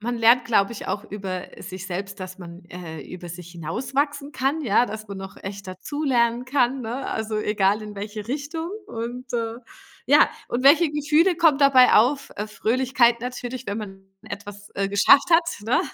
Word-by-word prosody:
man 240 +3 -2
lernt, 235 +2 +5
glaube 220 -2 +2
ich 225 - -8
auch 205 - -2
über, 190 -3 -6
äh, - - -11
sich 185 0 -7
selbst, 195 +2 -5
dass 185 0 -7
man, 175 -1 -11
äh, 170 -3 -8
über 175 +4 -9
sich 175 0 -9
hinauswachsen 275 - -2
kann, 275 +4 0
ja, 235 -2 +3
dass 215 -1 -7
man 200 - -6
noch 195 0 -9
echt 195 0 -7
dazulernen 240 +3 0
kann, 260 0 +1
ne? 245 +4 -4
Also, 220 0 -3
egal 210 -1 +1
in 210 -1 -8
welche 210 +2 -6
Richtung. 305 +4 -4 0.2
Und, 245 - -6
äh, 230 -1 -2 0.5
ja - - +6 0.2
und 245 +2 -2
welche 310 +3 +6
Gefühle 300 +4 +2
kommen 320 -5 +4
dabei 275 -3 +6
auf? 265 +6 +3
Äh, 210 - -3
Fröhlichkeit 240 +2 +2
natürlich, 250 +1 -5
wenn 200 +2 -3
man 195 -3 -9 0.2
etwas, 205 0 -9
äh, 195 0 -1
geschafft 240 - +5
hat, 330 0 +5 0.2
ne? 230 - +2
230 Hz, 180 wpm, -24 LUFS, 200-265 Hz, 0.5 s, ja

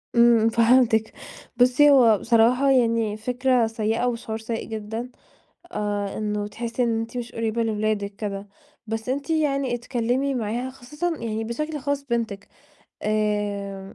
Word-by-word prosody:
إمم، 235 -1 +5
فهمتِك. 230 -1 +3 0.4
بُصِّي، 255 +4 +5
هو 240 -7 +6
بصراحة 235 +5 +3
يعني 230 -4 +2
فكرة 250 +1 +1
سيئة، 225 +2 -1
وشعور 230 -2 -3
سيئ 225 0 -4
جدًا، 220 +2 -5 0.6
آآ، 205 -1 -2
إنه 210 -1 -2
تحسي 230 +3 -3
إن 230 -2 +1
أنتِ 225 +2 -6
مش 240 0 -5
قريبة 230 0 -1
لولادِك 210 -2 -1
كده. 200 -1 -5 0.4
بس 225 +2 -4
أنتِ 280 +4 -2
يعني 275 -5 +1
اتكلمي 245 +3 -1
معاها، 240 +2 -2
خصوصًا 300 +6 -4
يعني 225 -1 -3
بشكل 305 +7 -3
خاص 285 0 -2
بنتِك. 230 -5 -3 0.5
آآ، 205 -2 -2
230 Hz, 135 wpm, -24 LUFS, 215-250 Hz, 0.6 s, هو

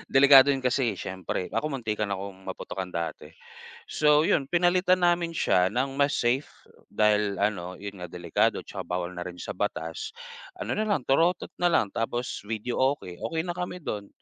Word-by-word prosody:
Delikado 135 0 +9
yun, 135 -2 +1
kasi 125 -3 +1
siyempre. 95 0 -4
Ako, 150 - -1
muntikan 110 -7 -2
akong 95 -1 -6
maputukan 95 0 -5
dati. 85 -2 -5 0.6
So, 150 0 +4
yun 140 -4 +2
pinalitan 180 +2 +3
namin 175 -1 +2
siya 90 -10 +3
ng 135 +6 -2
mas 140 0 +3
safe 125 +4 +1 0.4
dahil 105 -1 +2
ano, 95 -3 -1
yun 100 -1 -8
nga, 90 - -6
delikado 85 0 0
tsaka - - -9
bawal 90 0 -2
na 90 0 -6
rin 90 - -8
sa - - -5
batas. 80 0 -4 0.4
Ano - - -5
nalang, 210 -9 0
torotot 165 +7 +2
nalang, 170 - +2
tapos 120 +2 -3
videoke, 115 -3 -1
okey 160 -1 -2
na 175 - -3
kami 180 -1 -5
dun. 105 -7 -4
120 Hz, 160 wpm, -27 LUFS, 95-150 Hz, 0.6 s, Delikado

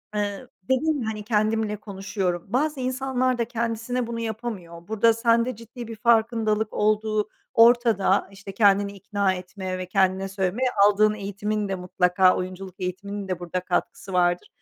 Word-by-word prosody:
eee, 205 -1 -2 0.2
dedin 275 +6 +1
hani, 220 -2 -4
"Kendimle 215 0 +1
konuşuyorum." 195 -3 -3
Bazı 280 +7 0
insanlar 255 0 0
da 235 - 0
kendisine 235 +1 -2
bunu 230 0 -4
yapamıyor. 215 -7 -6
Burada 220 +1 +3
sende 230 +2 +2
ciddi 230 +2 -10
bir 225 - -7
farkındalık 220 -1 +2
olduğu 215 0 +1 0.2
ortada. 230 -5 +4
İşte, 195 0 -10
kendini 200 -1 +3
ikna 200 -1 -1
etme 185 0 -5
ve 185 - -4
kendine 190 +1 +1
söylemeye. 195 +6 -1 0.2
Aldığın 210 +1 +4
eğitimin 210 +1 -3
de, 190 - -1
mutlaka, 180 0 +3
oyunculuk 185 0 -6
eğitiminin 195 +2 -4
de 185 -2 -3
burada 175 +1 -3
katkısı 185 +1 -3
vardır. 175 0 +2
210 Hz, 145 wpm, -24 LUFS, 190-230 Hz, 0.2 s, ortada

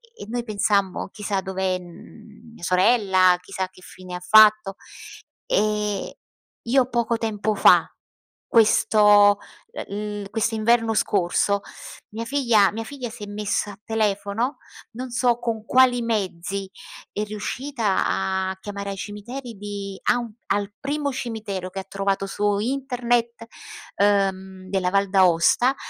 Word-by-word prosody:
e - - -9
noi 240 0 -2
pensammo: 200 -4 0
"Chissà 205 -2 -3
dov'è, 190 -1 -2
uhm, 215 +5 -15
mia 175 - -15
sorella, 185 -1 +4
chissà 190 +1 -4
che 185 - -19
fine 180 -1 -9
fatto." 215 -1 +5 0.7
E 210 - -1 0.5
io 255 +1 +2
poco 235 -1 0
tempo 215 -1 -1
fa, - - +6 0.6
questo, 210 -2 +5 0.4
ehm, 205 +1 -5
l'i 195 - -10
questo 225 +1 -1
inverno 225 +1 +2
scorso, 200 +1 +1 0.5
mia 225 +2 -5
figlia 235 -7 +3
mia 225 +1 -5
figlia 260 -3 -6
si 220 -2 -10
è - - -7
messa 205 0 -2
a 200 - -17
telefono, 220 +3 -1 0.3
non 250 +2 -7
so 240 -1 +1
con 225 -2 -3
quali 255 -1 +4
mezzi, 195 -3 -3 0.4
è 210 - -3
riuscita 215 +1 -2
a 190 0 -1
chiamare 200 -1 -5
ai - - -5
cimiteri 230 +4 -7
di 200 -1 -6
a - - +3
un 235 -2 -6 0.2
al 205 0 -1
primo 285 0 -2
cimitero 215 -7 -5
che 195 +1 -6
trovato 195 0 -1
su 205 +1 0
internet, 240 -2 -1 0.5
ehm, 190 -2 0
della 185 -2 0
Val 200 -1 +2
d'Aosta, 190 +7 +4
210 Hz, 130 wpm, -23 LUFS, 195-230 Hz, 0.7 s, fa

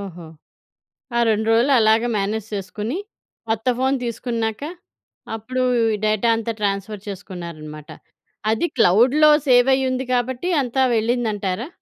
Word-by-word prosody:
ఓహో! 180 -4 -8 0.9
ఆ - - +3
2 220 0 +1
రోజులు 235 +5 +3
అలాగా 220 +2 +3
మేనేజ్ 210 +2 -2
చేసుకొని, 210 - -4 0.5
కొత్త 225 +2 -2
ఫోను 265 +1 +1
తీసుకున్నాక, 230 -1 -3 0.7
అప్పుడు 255 +4 -3 0.3
ఈ 210 - -1
డేటా 215 +2 +2
అంతా 230 0 -3
ట్రాన్స్‌ఫర్ 200 0 -2
చేసుకున్నారన్నమాట. 170 -6 -8 0.6
అది 225 +9 +1
క్లౌడ్‌లో 245 +10 +5 0.2
సేవ్ 245 +1 +5
అయ్యి 265 0 +1
ఉంది 255 0 -2
కాబట్టి 250 +7 -1
అంతా 265 +1 -1
వెళ్ళిందంటారా? 220 -2 -1
220 Hz, 120 wpm, -21 LUFS, 200-245 Hz, 0.9 s, క్లౌడ్‌లో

